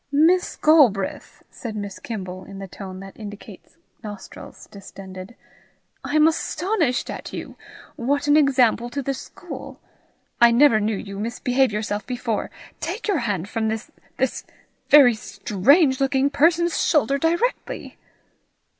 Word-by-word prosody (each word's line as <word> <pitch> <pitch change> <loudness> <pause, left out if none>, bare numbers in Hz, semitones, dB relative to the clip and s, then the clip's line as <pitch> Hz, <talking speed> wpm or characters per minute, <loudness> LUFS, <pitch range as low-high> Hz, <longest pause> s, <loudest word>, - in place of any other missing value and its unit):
"Miss 330 +6 +3
Galbraith!" 260 -12 +2
said 225 -3 -7
Miss 200 -2 -6
Kimble, 185 -5 -6
in 195 0 -11
the 195 0 -7
tone 190 0 -9
that 195 0 -11
indicates 205 -1 -11 0.3
nostrils 205 -2 -10
distended, 195 +1 -10 0.7
"I 290 - -3
am 310 0 +6
astonished 325 - -1
at - - -7
you! - - -7 0.4
What 280 +5 0
an 290 0 +4
example 255 -5 +3
to 280 +3 -4
the 275 - -1
school! 355 +6 -9 0.6
I 235 - +8
never 235 -1 +5
knew 215 0 -1
you 200 -1 -7
misbehave 245 +3 0
yourself 210 0 -3
before! 245 -3 -2 0.3
Take 455 - -4
your 400 -6 +1
hand 200 -7 -2
from 220 +1 -2
this 220 0 -4 0.3
this - - -1 0.5
very 275 -5 +8
strange 260 - +2
looking 270 +1 +2
person's 335 +4 +2
shoulder 280 -2 +2
directly." 345 - -2
245 Hz, 135 wpm, -23 LUFS, 205-290 Hz, 0.7 s, I